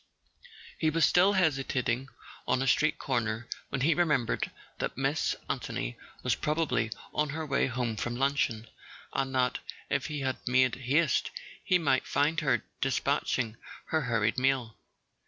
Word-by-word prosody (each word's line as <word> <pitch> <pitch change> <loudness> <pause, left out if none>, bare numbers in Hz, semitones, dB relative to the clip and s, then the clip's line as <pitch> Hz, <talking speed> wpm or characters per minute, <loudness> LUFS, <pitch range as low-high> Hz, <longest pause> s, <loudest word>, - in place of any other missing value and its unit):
He 160 - +3
was 165 +1 +4
still 185 +3 +5
hesitating 135 - +1 0.4
on 130 - +2
a - - -1
street 150 +3 +3
corner 115 -3 -1 0.2
when 135 - -2
he 160 +5 +4
remembered 150 -8 +1 0.3
that - - -3
Miss - - +1
Anthony - - -3 0.3
was - - +2
probably 155 -6 0 0.2
on 150 0 +1
her 160 +2 -3
way 140 -2 +1
home 120 -3 -2
for 120 - -2
luncheon, 125 -3 0 0.5
and 135 -1 -1
that 125 -1 +2 0.3
if - - +1
he 145 -2 -3 0.2
made 130 0 +4
haste 135 +3 +1 0.3
he 185 - +4
might 145 -6 +1
find 155 +3 +2
her 135 -7 +1 0.2
despatching 130 -4 0 0.3
her 160 - +2
hurried 115 -3 +1
meal. 130 -4 +1
135 Hz, 140 wpm, -30 LUFS, 120-150 Hz, 0.5 s, still